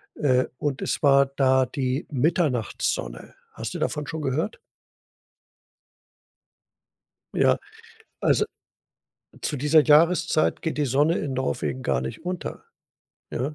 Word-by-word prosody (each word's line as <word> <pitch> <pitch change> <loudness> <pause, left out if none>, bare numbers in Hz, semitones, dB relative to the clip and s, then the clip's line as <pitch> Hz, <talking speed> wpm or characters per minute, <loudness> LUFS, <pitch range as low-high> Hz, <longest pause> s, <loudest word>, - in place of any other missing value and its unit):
äh, 130 -3 +2
und 145 -3 -2
es - - -2
war 140 -1 +5
da 130 -1 +2
die 130 +2 -2
Mitternachtssonne. 125 - -1 0.2
Hast - - -6
du - - -3
davon 150 -1 -2
schon 160 +1 -4
gehört? 145 - -1 2.8
Ja, - - +3 0.6
also, 430 - +3 1.0
zu 150 - -2
dieser 150 +3 +4
Jahreszeit 165 +2 +3
geht 160 -2 -3
die 145 - +1
Sonne 145 +6 +2
in 135 -3 -3
Norwegen 70 - -2
gar - - 0
nicht 65 - -6
unter, 180 -1 -5 0.7
ja? 135 +5 -3
140 Hz, 115 wpm, -25 LUFS, 130-155 Hz, 2.8 s, war